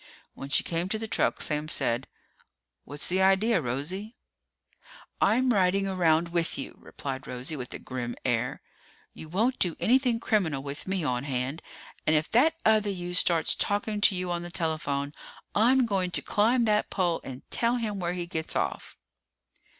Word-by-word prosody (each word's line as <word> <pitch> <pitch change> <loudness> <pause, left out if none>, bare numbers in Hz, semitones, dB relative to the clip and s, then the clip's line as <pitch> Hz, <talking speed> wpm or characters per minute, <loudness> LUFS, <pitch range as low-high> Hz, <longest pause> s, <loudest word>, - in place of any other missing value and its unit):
When 135 - -8
she - - +3
came 170 +2 -2
to 220 - 0
the 220 0 -5
truck, 215 - 0
Sam 150 0 -1
said, 120 -4 0 0.8
"What's 145 0 -7
the 185 +2 +1
idea, 195 +4 +4
Rosie?" 170 - -4 1.1
"I'm 250 +4 +4
riding 195 0 +2
around 170 -3 +2
with 170 -1 -1
you," 135 - -7
replied 135 -1 -6
Rosie, 125 +5 -4
with 125 -4 -6
a - - -4
grim 120 -2 -5
air. 125 -1 -1 0.5
"You 155 - -10
won't 225 +9 +1
do 175 -3 +1
anything 250 -1 +3
criminal 175 -12 0
with 140 +4 -7
me 190 -2 -1
on 125 -2 -1
hand! 135 +3 -2 0.5
And 155 - +4
if 155 +1 0
that 310 +8 +4
other 215 -1 +4
you 180 -2 -4
starts 170 -2 +3
talking 205 +1 -1
to 200 - +5
you 180 -1 -2
on 175 0 -1
the 175 - -7
telephone, 150 -4 -2 0.4
I'm 250 +4 +4
going 195 -5 0
to - - 0
climb 230 +4 +2
that 210 -1 +2
pole 175 -3 0
and 130 -1 -8
tell 235 +1 +2
him 215 -4 -2
where 175 -1 -1
he 175 -1 -3
gets 160 -2 -4
off!" - - -2
175 Hz, 175 wpm, -28 LUFS, 150-210 Hz, 1.1 s, to